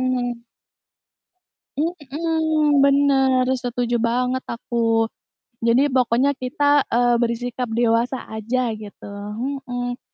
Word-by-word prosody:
heeh. 245 Hz, -1 st, -2 dB, 1.4 s
Mmm, 310 Hz, -1 st, +1 dB
benar, 270 Hz, -2 st, +3 dB, 0.2 s
setuju 245 Hz, -1 st, -1 dB
banget 250 Hz, +2 st, 0 dB
aku. 235 Hz, 0 st, -5 dB, 0.9 s
Jadi 240 Hz, +3 st, +4 dB
pokoknya 250 Hz, +2 st, +3 dB
kita, 255 Hz, +3 st, -3 dB, 0.2 s
eee, 240 Hz, 0 st, +2 dB
bersikap 245 Hz, +1 st, -2 dB
dewasa 235 Hz, +2 st, +2 dB
aja 230 Hz, +2 st, -1 dB
gitu. 205 Hz, -1 st, -11 dB, 0.6 s
Mhm. 245 Hz, 0 st, -3 dB
250 Hz, 90 wpm, -22 LUFS, 240-275 Hz, 1.4 s, Jadi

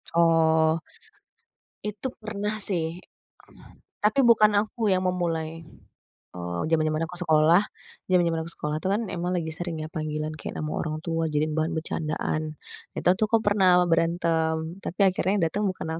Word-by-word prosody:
Oh. 160 Hz, -1 st, +4 dB, 1.1 s
Itu 210 Hz, +4 st, -3 dB
pernah 215 Hz, -1 st, -3 dB
sih. 175 Hz, -5 st, +1 dB, 1.0 s
Tapi 215 Hz, +6 st, +2 dB
bukan 215 Hz, -3 st, +6 dB
aku 215 Hz, 0 st, -2 dB
yang 185 Hz, 0 st, 0 dB
memulai, 165 Hz, -3 st, -2 dB, 0.7 s
eee, 85 Hz, -1 st, -4 dB
jaman-jaman 155 Hz, -1 st, +1 dB
aku 180 Hz, -, -9 dB
sekolah 160 Hz, +2 st, +4 dB, 0.5 s
jaman-jaman 170 Hz, -3 st, +2 dB
aku 170 Hz, -, -5 dB
sekolah 150 Hz, 0 st, -3 dB
tuh 190 Hz, -, 0 dB
kan, 220 Hz, -, 0 dB
emang 175 Hz, 0 st, -2 dB
lagi 165 Hz, -2 st, -2 dB
sering 175 Hz, -2 st, -4 dB
ya, 155 Hz, -, -5 dB
panggilan 155 Hz, 0 st, -3 dB
kayak -, -, -6 dB
nama 155 Hz, 0 st, -3 dB
orang 155 Hz, -1 st, -3 dB
tua 165 Hz, -1 st, -1 dB
jadiin 150 Hz, +1 st, 0 dB
bahan 160 Hz, +1 st, 0 dB
bercandaan. 155 Hz, -1 st, -2 dB, 0.5 s
Itu -, -, 0 dB
tuh 215 Hz, -, +2 dB
aku 230 Hz, -, +5 dB
pernah 190 Hz, -3 st, +5 dB
berantem, 165 Hz, 0 st, 0 dB
tapi 180 Hz, -, -6 dB
akhirnya 185 Hz, 0 st, 0 dB
yang 175 Hz, -, +2 dB
datang 205 Hz, +5 st, -2 dB
bukan 185 Hz, -, -6 dB
165 Hz, 150 wpm, -26 LUFS, 160-185 Hz, 1.1 s, bukan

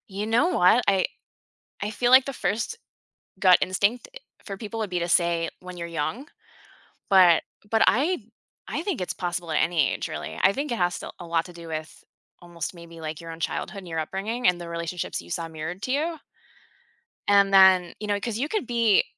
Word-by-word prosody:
You 200 Hz, +1 st, -4 dB
know 230 Hz, +9 st, +3 dB
what? 230 Hz, -, +4 dB
I 195 Hz, -2 st, +3 dB, 0.8 s
I 205 Hz, -, -2 dB
feel 240 Hz, +3 st, 0 dB
like 260 Hz, 0 st, +8 dB
the 275 Hz, -, -4 dB
first 230 Hz, -, -2 dB, 0.6 s
gut 185 Hz, -2 st, +7 dB
instinct 200 Hz, +6 st, 0 dB
i -, -, -8 dB, 0.3 s
for 195 Hz, -2 st, -6 dB
people 220 Hz, +2 st, -6 dB
would 215 Hz, -2 st, -2 dB
be 180 Hz, -1 st, -1 dB
to 170 Hz, +1 st, -2 dB
say 170 Hz, -1 st, +2 dB
when 180 Hz, 0 st, -9 dB
you're 170 Hz, 0 st, -5 dB
young, 170 Hz, -, -3 dB, 0.8 s
but 180 Hz, -4 st, +6 dB, 0.3 s
but 225 Hz, 0 st, +3 dB
I 270 Hz, -, +1 dB, 0.4 s
I -, -, -3 dB
think 370 Hz, -, -2 dB
it's 180 Hz, -, -2 dB
possible 175 Hz, -2 st, -4 dB
at 155 Hz, -, +1 dB
any 165 Hz, -5 st, +2 dB
age, -, -, -3 dB
really, -, -, -6 dB
I 195 Hz, -, +5 dB
think 280 Hz, +3 st, -3 dB
it 235 Hz, -, -1 dB
has 175 Hz, -1 st, 0 dB
to -, -, -7 dB
a 175 Hz, -, -8 dB
lot 165 Hz, -1 st, 0 dB
to 180 Hz, -, -11 dB
do 170 Hz, -1 st, -11 dB
with, 155 Hz, 0 st, -6 dB, 0.4 s
almost, 170 Hz, -1 st, -6 dB
maybe, 170 Hz, -1 st, -12 dB
like, 155 Hz, -1 st, -5 dB
your 165 Hz, 0 st, -8 dB
own 165 Hz, -, -9 dB
childhood, 200 Hz, -, -3 dB
and 185 Hz, -, -12 dB
your 165 Hz, -1 st, -3 dB
upbringing, 200 Hz, +9 st, -3 dB
and 180 Hz, -1 st, +3 dB
the 170 Hz, -, -7 dB
relationships 170 Hz, +1 st, -4 dB
that -, -, -9 dB
you 85 Hz, -, -13 dB
saw 165 Hz, -, -3 dB
mirrored 160 Hz, +3 st, -6 dB
to 255 Hz, -, -2 dB
you 315 Hz, +4 st, -1 dB, 1.1 s
and 200 Hz, -1 st, +4 dB
then 190 Hz, -2 st, +6 dB
you 210 Hz, -, -5 dB
know, 205 Hz, -1 st, 0 dB
'cause 220 Hz, 0 st, -3 dB
you 280 Hz, +6 st, -2 dB
could 425 Hz, -, -2 dB
be 230 Hz, -4 st, +3 dB
190 Hz, 215 wpm, -25 LUFS, 170-225 Hz, 1.1 s, like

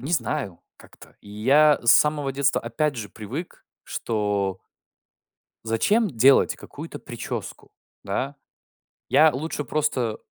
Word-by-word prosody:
не 140 Hz, +8 st, -5 dB
знаю 120 Hz, -, -2 dB, 0.2 s
как-то. -, -, -17 dB
И 100 Hz, -, -15 dB
я 140 Hz, +8 st, +4 dB
с 115 Hz, -, +6 dB
самого 150 Hz, -2 st, +2 dB
детства, 140 Hz, 0 st, +1 dB
опять 140 Hz, +5 st, -2 dB
же, 105 Hz, -3 st, -5 dB
привык, 115 Hz, -, -8 dB, 0.2 s
что 100 Hz, -3 st, -2 dB, 1.0 s
зачем 205 Hz, -, +2 dB
делать 135 Hz, 0 st, +4 dB
какую-то -, -, -9 dB
прическу, -, -, -7 dB, 0.3 s
да? 130 Hz, +8 st, -3 dB, 0.7 s
Я 155 Hz, 0 st, +5 dB
лучше 150 Hz, +2 st, -4 dB
просто, 130 Hz, -5 st, -1 dB
130 Hz, 115 wpm, -24 LUFS, 110-150 Hz, 1.0 s, с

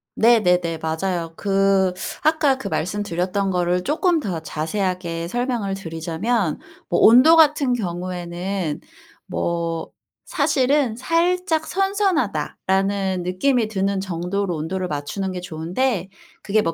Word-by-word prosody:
네네네. 180 Hz, -8 st, +3 dB
맞아요. 165 Hz, +1 st, -2 dB
그 195 Hz, -2 st, +2 dB, 0.3 s
아까 305 Hz, -4 st, +3 dB
그 225 Hz, -, -6 dB
말씀드렸던 190 Hz, +1 st, -1 dB
거를 180 Hz, 0 st, +1 dB
쪼끔 335 Hz, -, +1 dB
더 185 Hz, -, -3 dB
자세하게 170 Hz, +1 st, -3 dB
설명을 240 Hz, -5 st, -1 dB
드리자면 170 Hz, +2 st, -2 dB, 0.3 s
뭐 175 Hz, -, +1 dB
온도같은 285 Hz, +2 st, +6 dB
경우에는 180 Hz, -3 st, -3 dB, 0.4 s
뭐 170 Hz, -1 st, -2 dB, 0.4 s
사실은 265 Hz, -3 st, +1 dB
'살짝 330 Hz, +4 st, +1 dB
선선하다.'라는 200 Hz, -, 0 dB
느낌이 220 Hz, +6 st, +1 dB
드는 195 Hz, -2 st, -1 dB
정도로 180 Hz, +1 st, -2 dB
온도를 180 Hz, +4 st, -3 dB
맞추는 180 Hz, +6 st, -3 dB
게 180 Hz, -, -4 dB
좋은데 180 Hz, +5 st, -2 dB, 0.3 s
그게 215 Hz, +1 st, +1 dB
뭐 165 Hz, -4 st, -1 dB
195 Hz, 260 characters per minute, -22 LUFS, 175-245 Hz, 0.4 s, 온도같은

